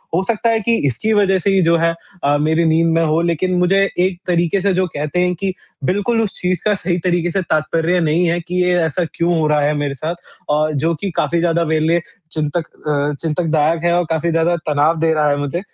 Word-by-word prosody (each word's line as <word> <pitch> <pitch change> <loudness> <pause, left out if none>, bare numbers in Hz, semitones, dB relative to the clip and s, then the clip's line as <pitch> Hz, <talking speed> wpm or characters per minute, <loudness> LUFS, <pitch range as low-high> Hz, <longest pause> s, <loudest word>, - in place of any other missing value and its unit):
हो 180 - +2
सकता 230 +3 0
है 225 - +2
कि 230 +2 +1
इसकी 175 - -1
वज़ह 195 -2 +3
से 200 - 0
ही 195 -1 +3
जो 170 0 +3 0.5
अ, 145 +1 +3
मेरी 160 +2 +1
नींद 165 +1 +3
में 165 - +2
हो 155 +2 +1
लेकिन 170 +2 0
मुझे 195 +2 +3 0.2
एक 180 -1 +1
तरीके 175 +2 +1
से 200 0 +1
जो 185 +1 +1
कहते 150 +2 -3
हैं 180 0 +2
कि 190 +2 -3 0.3
बिल्कुल 205 - +1
उस 215 -4 -3
चीज़ 180 -1 -1
का 210 - +3
सही 180 -2 -2
तरीके 175 -1 0
से 195 - 0
तात्पर्य 165 +2 0
नहीं 165 +2 +1
है 170 +1 0
कि 180 +2 -1
ये 180 0 +2
ऐसा 165 +2 -1
क्यों 170 0 0
हो 155 - +1
रहा 150 -1 +2
है 145 +1 +1
मेरे 145 -1 -2
साथ? 155 +5 -4 0.3
और 155 +1 +1
जो 160 +4 +1
कि 200 -2 -3
काफ़ी 160 +3 0
ज़्यादा 170 0 +1
मेरे 155 0 0
लिए 170 +1 +2 0.3
चिंतक 155 +1 -2 0.2
अ, 145 0 0
चिंतकदायक 160 0 0
है 170 0 +2
और 175 - +2
काफ़ी 160 +1 0
ज़्यादा 165 +1 +2
तनाव 150 +2 +2
दे 160 0 +2
रहा 150 -1 +2
है 145 - +1
मुझे। 145 +4 -2
170 Hz, 235 wpm, -18 LUFS, 155-180 Hz, 0.5 s, वज़ह